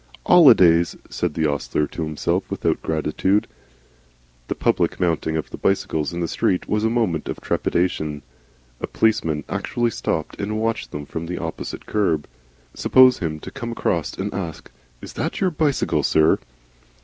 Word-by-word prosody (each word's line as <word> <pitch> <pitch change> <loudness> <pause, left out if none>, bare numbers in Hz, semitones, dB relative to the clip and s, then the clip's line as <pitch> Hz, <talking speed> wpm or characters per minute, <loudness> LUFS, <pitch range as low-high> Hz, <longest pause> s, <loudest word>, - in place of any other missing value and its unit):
"'Olidays," 90 - +6 0.2
said 85 -4 -2
the 80 - +1
ostler 75 +1 0
to 80 - -7
himself, 75 -1 -1
without - - -1
gratitude. 80 +6 0 1.0
The - - -2
public - - +1
mounting 80 -2 0
of 80 - -5
the - - -6
bicycles 80 -6 0
in 85 0 -4
the 85 - 0
street 90 +2 0
was 105 0 0
a 110 - +3
moment 110 -10 0
of - - -4
trepidation. 80 -4 -1 0.6
A - - -3
policeman 80 -10 +1
actually 120 -1 -1
stopped 80 -4 -3
and 105 +2 -2
watched 115 0 -1
them 75 -1 -6
from 80 +3 -6
the 90 - -4
opposite 80 -1 -6
kerb. 85 -8 0 0.5
Suppose 130 -1 +5
him 80 -2 -3
to - - -8
come 120 -4 -5
across - - -1
and 100 +2 -4
ask: 85 -9 -6 0.3
"Is - - -8
that - - -3
your 185 -2 +2
bicycle, 150 -3 +1
sir?" 80 0 +3
85 Hz, 160 wpm, -22 LUFS, 80-110 Hz, 1.0 s, Olidays